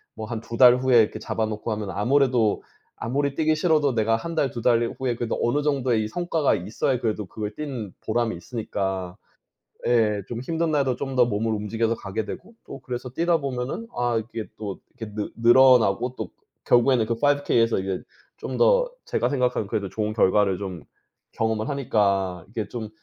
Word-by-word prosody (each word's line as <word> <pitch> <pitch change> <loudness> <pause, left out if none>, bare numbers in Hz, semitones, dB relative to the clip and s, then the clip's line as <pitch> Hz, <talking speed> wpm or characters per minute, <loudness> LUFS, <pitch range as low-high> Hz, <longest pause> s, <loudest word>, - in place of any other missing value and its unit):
뭐 110 - -5
한 115 -1 -4
2 115 - -7
달 125 -1 +8
후에 125 -2 +5
이렇게 110 0 -1
잡아 110 0 -2
놓고 110 +1 -4
하면 105 -2 -3
아무래도 120 +1 +2 0.4
아무리 140 +4 -1
뛰기 155 0 +2
싫어도 155 -4 +2
내가 110 0 +2
1 165 +7 -6
달 140 -5 +1
2 120 - -5
달 120 -1 +2
후에 130 -2 0
그래도 120 -1 -3
어느 145 +5 +1
정도의 130 -6 +1
이 - - -3
성과가 165 +1 +1
있어야 110 +7 -1
그래도 110 -3 -2
그걸 105 +3 -6
뛰는 130 -10 -5
보람이 115 -2 0
있으니까 95 -2 -4 0.7
예 110 -4 +2
좀 120 -1 -4
힘든 165 +4 -1
날에도 135 -4 +1
좀 135 +1 -4
더 125 - +6
몸을 110 0 -1
움직여서 110 +2 -1
가게 105 +2 -4
되고 185 - -8
또 - - -8
그래서 125 0 -5
뛰다 170 +5 +1
보면은 135 - -4
아 120 -1 +1
이게 115 -2 -6
또 100 -3 -6 0.2
이렇게 110 -2 -7
느 105 -1 -3
늘어나고 120 -1 +5
또 110 -5 -5 0.3
결국에는 120 -1 +4
그 115 - -1
5 145 +4 +1
K에서 115 -1 +2
이게 95 -1 -2 0.4
좀 - - -5
더 - - +4
제가 - - 0
생각하는 125 -6 0
그래도 100 -1 -2
좋은 105 +2 -2
결과를 100 -2 +3
좀 95 -5 -6 0.5
경험을 110 +1 -1
하니까 100 - 0
이게 110 -1 -4
좀 115 -3 -5
115 Hz, 360 characters per minute, -24 LUFS, 105-130 Hz, 0.7 s, 달